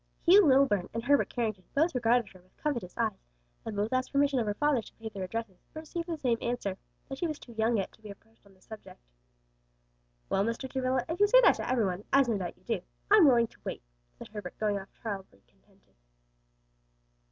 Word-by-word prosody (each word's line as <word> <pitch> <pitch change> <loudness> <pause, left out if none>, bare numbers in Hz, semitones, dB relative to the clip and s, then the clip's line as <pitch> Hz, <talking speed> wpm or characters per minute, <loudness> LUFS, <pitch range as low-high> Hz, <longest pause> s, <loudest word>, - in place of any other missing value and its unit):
Hugh 385 +4 +8
Lilburn 260 -9 +3
and 230 - -2
Herbert 285 +2 +3
Carrington 215 -6 -3
both 320 +5 +2
regarded 240 -3 +2
her 185 - -17
with 185 - -31
covetous 240 -12 -3
eyes, 220 -4 -1 0.4
and 220 - -5
both 210 +4 -1
asked 255 0 0
permission 280 -1 +2
of 225 - -1
her 205 - -1
father 295 -1 +2
to - - -15
pay 225 0 -7
their 195 -3 -5
addresses, 215 -1 -5
but 315 - -6
received 335 +2 -5
the 335 -2 -3
same 245 -6 0
answer; 220 -6 -3 0.3
that 270 0 -7
she 345 - 0
was 305 -2 -4
too 240 - -14
young 225 +1 +1
yet 195 - -2
to - - -23
be 215 - -10
approached 225 +3 -15
on 200 -1 -21
that 185 - -26
subject. 220 - -12 1.3
"Well, 195 - +1
Mr. 230 +4 -3
Travilla, 260 -1 -1
if 330 - -4
you 410 - +6
say - - +7
that - - +6
to - - -4
every 245 -4 +2
one, 185 +1 -3
as 275 -1 +5
no 220 -4 0
doubt 175 -2 -5
you - - -28
do, 225 -6 -2 0.3
I'm 410 -7 +8
willing 240 -3 +5
to - - -18
wait," - - -5 0.3
said - - -10
Herbert 210 -1 -8
going 210 -2 0
off 195 - -11
tolerably 195 - -6
contented. 65 - -32
230 Hz, 220 wpm, -30 LUFS, 205-270 Hz, 1.3 s, Hugh